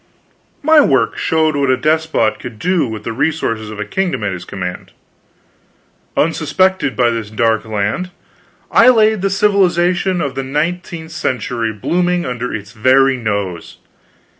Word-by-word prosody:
My 315 +1 +6
works 130 - +1
showed 160 -1 +1
what 140 -2 +1
a 130 - +3
despot 155 -6 +1
could 115 -3 -8
do 175 0 +1
with 110 -2 -6
the 115 - -4
resources 125 -6 -1
of 105 -1 -8
a 105 - -3
kingdom 180 - -2
at 105 - -1
his 90 - -7
command. 90 -2 -6 1.2
Unsuspected 165 0 +1
by 120 -2 +2
this 115 -3 -4
dark 110 0 0
land, 110 - -2 0.6
I 230 - +6
had 220 -4 +4
the 195 - +1
civilization 185 -2 +2
of 140 -5 -2
the 135 - -3
nineteenth 160 +4 -3
century 125 -6 -2
booming 175 - 0
under 125 -1 -4
its 100 -1 -6
very 130 +4 +3
nose! 100 -7 -4
135 Hz, 145 wpm, -16 LUFS, 110-175 Hz, 1.2 s, My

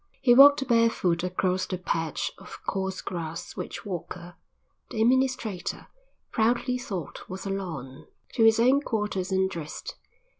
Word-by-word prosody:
He 245 - +5
walked 275 +1 +8
barefoot 230 -8 +2
across 185 0 0
the 185 - -3
patch 165 -3 -2
of - - -10
coarse 190 -1 -2
grass 165 -2 -6
which - - -6
Walker, 175 -1 -6 0.6
the 220 - -5
administrator, 235 -6 0 0.4
proudly 245 +3 +1
thought 190 - -6
was 190 +1 -6
a 195 - -2
lawn, 160 -9 -6 0.3
to 225 - +2
his 225 0 +6
own 260 +4 +4
quarters 210 -7 -2
and 190 0 +2
dressed. 165 -5 -6
190 Hz, 140 wpm, -27 LUFS, 175-235 Hz, 0.6 s, walked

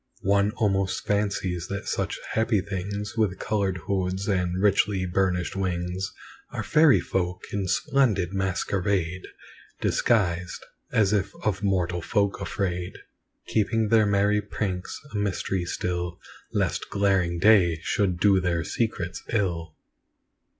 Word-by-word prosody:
One 100 +1 +3
almost 95 -3 0
fancies 95 -4 -1
that 100 0 -5
such - - -1
happy 110 -1 +2
things, 100 +2 -4
With 105 -5 +1
coloured 100 -3 -1
hoods 95 +1 -1
and 90 -3 0
richly 100 -1 +2
burnished 90 0 0
wings, 90 0 -2 0.4
Are - - -4
fairy 155 -3 +5
folk, 90 -1 -2
in 100 -2 -1
splendid 100 -5 +1
masquerade 95 -1 -1 0.5
Disguised, 90 -6 +1 0.3
as 105 -2 +3
if 100 -1 +1
of 100 -3 0
mortal 90 -3 0
folk 100 +4 0
afraid, 90 -3 -3 0.5
Keeping 110 0 +1
their 110 -2 +5
merry 100 +1 +3
pranks 95 -3 -4
a - - -2
mystery 95 -2 -1
still, 90 0 -3 0.3
Lest - - -1
glaring 95 -4 +1
day 90 -4 +5
should 95 -4 0
do 95 0 +4
their 85 -2 0
secrets 95 -6 -2
ill. 85 -7 -1
95 Hz, 120 wpm, -26 LUFS, 90-105 Hz, 0.5 s, fairy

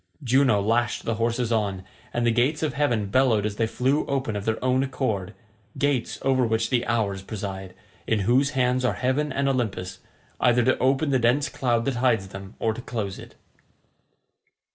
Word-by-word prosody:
Juno 130 -3 +3
lashed 115 +4 0
the 115 - 0
horses 120 0 0
on, 100 -4 -1 0.3
and 120 0 -1
the 120 - +4
gates 130 +7 +1
of 155 - 0
heaven 120 -9 0
bellowed 125 -5 +3
as 105 -1 -3
they 115 - +1
flew 130 +6 +1
open 130 -6 -1
of 100 0 -4
their 110 0 0
own 130 0 +3
accord—gates 115 +1 -3
over 135 -1 +2
which 115 +1 0
the 120 -2 +2
Hours 105 -5 0
preside, 95 -2 -6 0.3
in 110 -2 +1
whose 125 +7 +3
hands 125 0 +2
are 125 - +1
Heaven 135 +4 0
and 140 +1 0
Olympus, 100 -8 -2 0.4
either 120 0 +3
to 130 +2 +2
open 135 +3 +2
the 130 - +3
dense 125 +5 +2
cloud 120 -3 0
that 135 -3 -1
hides 115 -6 +1
them, 95 +1 -10
or 110 - 0
to 125 - -7
close 105 -6 -4
it. - - -12
120 Hz, 180 wpm, -25 LUFS, 105-130 Hz, 0.4 s, the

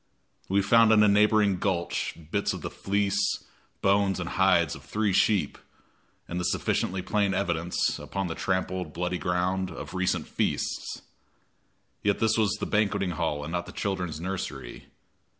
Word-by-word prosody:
We 100 +1 +3
found 115 +2 +5
in 105 -1 +6
a - - +6
neighboring 105 -2 +4
gulch 90 -4 -1
bits - - 0
of - - -7
the - - -4
fleece, 100 0 0 0.4
bones 100 -1 +3
and 85 - -3
hides 85 -5 +3
of - - -10
three 105 -2 0
sheep, 100 0 +2 0.7
and 85 - -3
the - - -2
sufficiently 95 +1 0
plain 100 -2 +1
evidence, 85 -3 0
upon 95 0 -3
the 85 - -3
trampled 95 0 -1
and 75 - -16
bloody 90 +1 -2
ground, 90 +1 0
of 75 - -8
recent 95 -1 0
feasts. - - -2 1.0
Yet 100 -1 +2
this 110 0 +2
was 105 -3 +2
the 105 - -3
banqueting 100 -3 +1
hall 80 -4 -2
and 80 - -6
not 90 0 -2
the - - -8
children's 90 -6 -3
nursery. 90 -8 -5
95 Hz, 160 wpm, -27 LUFS, 90-100 Hz, 1.0 s, in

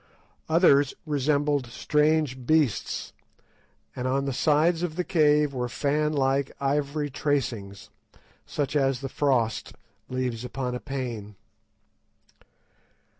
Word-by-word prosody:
Others 145 -4 +4
resembled 145 -2 +1
strange 150 0 +1
beasts, 155 -9 +1 0.8
and 125 - -3
on 135 +2 0
the 135 - -2
sides 160 +5 +2
of 175 -3 -2
the 180 - -1
cave 150 -4 +3
were 125 -1 -2
fanlike 140 -1 0
ivory 145 +1 -1
tracings, 120 -9 -2 0.5
such 145 0 -3
as 135 -3 +1
the 135 - -4
frost 125 -7 0 0.4
leaves 125 -2 -2
upon 125 0 -3
a 125 - -3
pane. 120 -7 -5
140 Hz, 105 wpm, -26 LUFS, 130-150 Hz, 0.8 s, Others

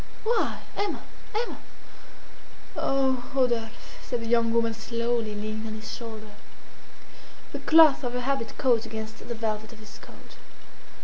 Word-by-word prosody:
"Why? 465 +2 +1
Emma! 405 0 -1 0.3
Emma!" 460 +2 -2 1.2
"Oh, 265 -2 +1
Rodolphe!" 240 -4 +2 0.3
said 245 - -3
the - - -4
young 230 -1 +3
woman 230 0 +2
slowly, 230 -1 -1
leaning 215 +1 -4
on 215 - -5
his 220 0 -6
shoulder. 220 -2 -8 1.2
The - - -4
cloth 315 -3 +7
of 245 -1 -2
her 250 - -1
habit 270 -2 -1
caught 235 -3 +3
against 220 0 -6
the 235 - -5
velvet 220 0 -3
of - - -13
his 215 -1 -12
coat. - - -14
230 Hz, 140 wpm, -27 LUFS, 220-255 Hz, 1.2 s, cloth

